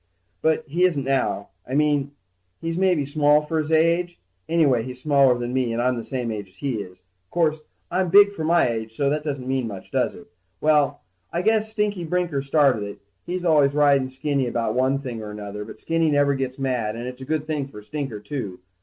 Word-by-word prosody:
But 160 0 +2
he 170 +5 0
isn't 165 -7 +2
now, 130 -6 0 0.2
I 130 - -3
mean 145 -1 +1 0.5
he's 165 0 -3
maybe 180 -5 +2
small 150 +1 +3
for 160 +1 -1
his 155 0 -2
age, 170 +2 +2 0.3
anyway 150 -8 +3
he's 125 +2 -7
smaller 140 -3 +4
than 120 0 -4
me, 130 -3 +1
and 115 - -2
I'm 125 +1 +2
the 115 - -4
same 125 -2 -3
age 105 -2 -5
as 95 - -24
he 125 -2 -2
is. 90 -2 -10 0.3
'Course, 160 0 +1 0.3
I'm 185 0 +1
big 200 +2 +7
for 160 - -5
my 170 -1 +4
age, 110 -1 -4
so 140 +2 +1
that 150 0 -1
doesn't 135 -4 -4
mean 130 -2 0
much, 100 -3 -9
does - - 0
it? - - -12 0.3
Well, 150 -3 +2 0.3
I 170 +1 -1
guess 220 +1 +2
Stinker 210 -4 -1
Brinker 170 -4 -1
started 140 -4 +3
it. 100 0 -6 0.3
He's 180 0 -3
always 145 -4 +4
riding 140 -3 +4
Skinny 135 0 -1
about 115 -2 -1
one 130 +2 +2
thing 125 -5 -6
or 105 - -7
another, 105 0 -6
but 105 - -11
Skinny 165 -1 +1
never 145 -1 +3
gets 135 -1 -3
mad 125 -5 -1
and 120 +1 -5
it's 125 +1 -7
a - - -5
good 155 +2 -2
thing 150 -3 -2
for 105 -6 -11
Stinker, 135 -1 -5
too. 105 -6 -5
140 Hz, 215 wpm, -23 LUFS, 125-160 Hz, 0.5 s, big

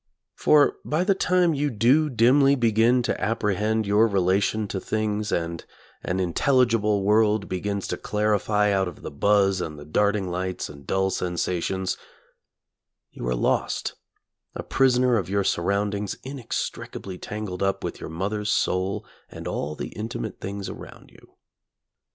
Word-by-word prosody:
For 150 -1 +4
by 155 +4 0
the 195 +1 +3
time 180 -3 +2
you 145 0 0
do 130 +7 +3
dimly 135 +3 +4
begin 120 0 +3
to - - -2
apprehend 110 +1 0
your 105 +3 +4
relation 100 +2 +1
to 95 - -3
things 105 0 -2
and 85 0 -2 0.4
an 90 +1 -2
intelligible 105 - +2
world 105 0 +3
begins 100 +2 -3
to - - -2
clarify 105 0 +1
out 95 -1 +1
of 90 - -9
the - - -6
buzz 95 +4 +2
and 75 -3 -5
the 75 - -10
darting 100 +3 +1
lights 90 +1 -3
and 70 -1 -13
dull 95 0 +1
sensations, 90 +1 -2 1.1
you - - -6
are 60 - +1
lost, - - 0 0.6
a - - -4
prisoner 125 -2 +3
of 95 -4 -2
your 100 0 +1
surroundings 100 +3 -1
inextricably 115 -7 -5
tangled 105 -3 -5
up 95 0 0
with - - -4
your - - -7
mother's 105 +6 -3
soul 95 0 0 0.2
and - - -8
all 75 +1 -3
the - - -5
intimate 110 0 -5
things 100 0 -5
around - - -10
you. - - -20
105 Hz, 145 wpm, -25 LUFS, 95-115 Hz, 1.1 s, For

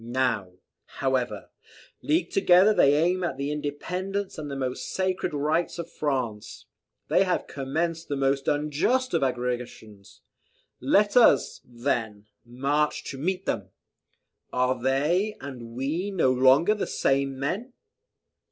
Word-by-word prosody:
Now, 120 -6 -1 0.4
however, 125 -5 -1 0.5
leagued 165 +3 0
together, 190 +2 +5
they 140 -7 +5
aim 175 +4 +1
at 155 -6 -2
the 140 +1 -2
independence 180 +7 -4
and 150 -1 -6
the 140 - -4
most 130 -1 -4
sacred 185 -1 -1
rights 155 +4 -1
of 170 0 -6
France. 130 -10 -3 0.4
They - - +4
have 180 -2 -1
commenced 160 +5 -3
the 145 - -2
most 135 0 0
unjust 150 - +1
of - - +2
aggressions. 120 -5 -4 0.6
Let 200 +10 +2
us, 230 - +4
then, 120 -4 -3 0.2
march 140 +5 -1
to 135 - -8
meet 185 +5 -2
them. 100 - -2 0.8
Are 125 0 0
they 155 - +1
and 120 -4 -9
we 155 +10 -2
no 170 -10 +2
longer 130 +9 +5
the 210 - -3
same 135 0 0
men? 195 - -3
140 Hz, 130 wpm, -26 LUFS, 130-175 Hz, 0.8 s, together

